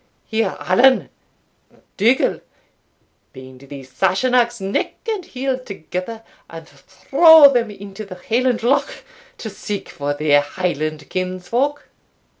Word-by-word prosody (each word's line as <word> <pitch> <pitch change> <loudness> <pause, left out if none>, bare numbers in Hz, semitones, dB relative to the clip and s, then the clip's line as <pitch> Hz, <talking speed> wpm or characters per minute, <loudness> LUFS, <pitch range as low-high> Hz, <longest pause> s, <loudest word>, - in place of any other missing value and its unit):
Here 220 -3 -2
Allan 240 - +3 0.9
Dougal 235 +6 +1 0.9
bind 130 -1 -13
these 135 -2 -11
Sassenachs 240 - +1
neck 195 +1 -3
and 430 -4 -2
heel 265 -3 -3
together, 200 0 -7 0.3
and 165 -1 -11
throw 285 - +5
them 235 -3 0
into 200 0 -9
the 200 -3 -10
Highland 240 +5 -1
Loch 265 +4 0 0.3
to 220 - -7
seek 205 0 -6
for 145 0 -4
their 145 -1 +3
Highland 155 -1 -4
kinsfolk." 185 +10 -2
200 Hz, 110 wpm, -19 LUFS, 165-250 Hz, 0.9 s, throw